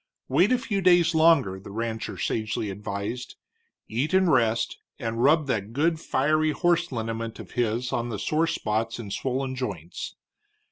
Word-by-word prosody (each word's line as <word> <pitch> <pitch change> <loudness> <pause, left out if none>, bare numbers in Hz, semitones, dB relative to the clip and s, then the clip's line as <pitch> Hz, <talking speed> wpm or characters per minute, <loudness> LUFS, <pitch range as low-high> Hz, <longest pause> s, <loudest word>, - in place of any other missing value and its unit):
Wait 170 - +3
a 255 - +5
few 205 -5 -2
days 175 -2 +5
longer, 155 - +4
the 95 - -11
rancher 110 +1 -4
sagely 110 -2 -2
advised, 105 +5 -5 0.5
eat 135 +11 0
and 190 -3 +4
rest, 115 -3 +2 0.2
and 115 -3 -3
rub 150 +4 +4
that 110 -4 -2
good 160 +4 +1
fiery 155 +2 +1
horse 175 +2 +1
liniment 115 -1 -3
of - - -10
his 120 +1 -1
on 120 0 -1
the 110 - -3
sore 155 +9 +1
spots 115 -4 -1
and 105 -4 -6
swollen 130 0 -2
joints. 95 -10 -5
125 Hz, 155 wpm, -26 LUFS, 110-155 Hz, 0.5 s, a